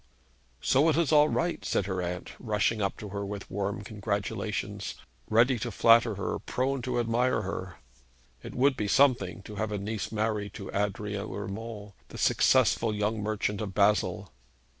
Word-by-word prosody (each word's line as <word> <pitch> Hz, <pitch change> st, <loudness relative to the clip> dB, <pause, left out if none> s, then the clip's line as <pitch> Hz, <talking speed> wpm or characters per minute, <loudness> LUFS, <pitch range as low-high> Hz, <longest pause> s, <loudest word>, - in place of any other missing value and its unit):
'So 145 Hz, +5 st, +4 dB
it 155 Hz, -, +2 dB
is 165 Hz, -4 st, +2 dB
all 150 Hz, 0 st, +6 dB
right,' 170 Hz, +1 st, -1 dB
said 100 Hz, -, 0 dB
her 95 Hz, -2 st, -2 dB
aunt, 90 Hz, 0 st, -4 dB
rushing 110 Hz, 0 st, 0 dB
up 100 Hz, -, -1 dB
to 105 Hz, -, -7 dB
her 100 Hz, +1 st, -4 dB
with 100 Hz, 0 st, -6 dB
warm 100 Hz, +1 st, -2 dB
congratulations, 100 Hz, 0 st, -3 dB, 0.3 s
ready 120 Hz, +3 st, +4 dB
to 120 Hz, -, -3 dB
flatter 115 Hz, +1 st, +5 dB
her, 100 Hz, -, -3 dB
prone 135 Hz, +1 st, -1 dB
to 125 Hz, 0 st, -1 dB
admire 120 Hz, +2 st, +1 dB
her. -, -, -5 dB, 0.7 s
It -, -, -9 dB
would 135 Hz, +2 st, +3 dB
be 105 Hz, -, -2 dB
something 100 Hz, -6 st, +3 dB
to 105 Hz, +1 st, -9 dB
have 110 Hz, 0 st, -2 dB
a 105 Hz, -, -1 dB
niece 105 Hz, +1 st, -4 dB
married 105 Hz, -2 st, -2 dB
to 100 Hz, -3 st, -7 dB
Adrian 105 Hz, +1 st, -2 dB
Urmand, 105 Hz, +1 st, -6 dB, 0.2 s
the -, -, -10 dB
successful 110 Hz, -2 st, +3 dB
young 105 Hz, +1 st, -1 dB
merchant 105 Hz, -1 st, -1 dB
of 100 Hz, -3 st, -5 dB
Basle. 105 Hz, -9 st, +2 dB
105 Hz, 165 wpm, -29 LUFS, 100-115 Hz, 0.7 s, all